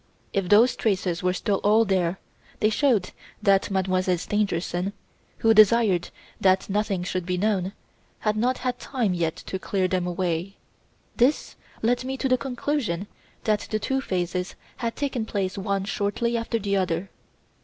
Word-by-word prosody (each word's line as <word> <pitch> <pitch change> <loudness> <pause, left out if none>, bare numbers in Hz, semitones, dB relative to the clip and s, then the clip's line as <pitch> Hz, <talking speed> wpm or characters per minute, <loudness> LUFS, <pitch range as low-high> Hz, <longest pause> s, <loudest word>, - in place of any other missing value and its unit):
If 195 -3 0
those 225 +5 +6
traces 185 -5 0
were 180 - +2
still 195 +2 0
all 215 +3 +4
there, 185 -2 +1 0.4
they 215 - +3
showed 225 -6 +2 0.3
that 195 -2 +3
Mademoiselle 185 -1 +1
Stangerson 185 -1 -1 0.4
who 225 0 +4
desired 215 -4 +5 0.3
that 190 -1 +3
nothing 200 -2 0
should 185 0 -2
be 180 +1 -2
known 195 -1 0 0.5
had 215 -1 +1
not 245 +4 +1
yet - - -11
had 250 -1 -1
time 240 -9 -1
to 170 +2 -3
clear 190 -1 0
them 185 -1 -1
away. 180 +1 -2 0.6
This 255 +5 +2 0.3
led 245 +2 +2
me 265 +1 -3
to 265 - 0
the 255 - +4
conclusion 245 - -2 0.4
that 215 -1 0
the 215 - 0
two 265 +5 -1
phases 180 -4 -2 0.2
had 235 -2 -3
taken 270 -5 -2
place 200 -3 -2
one 195 0 -1
shortly 210 +4 -1
after 230 0 -1
the 200 -2 0
other. 185 0 -1
200 Hz, 155 wpm, -25 LUFS, 185-225 Hz, 0.6 s, those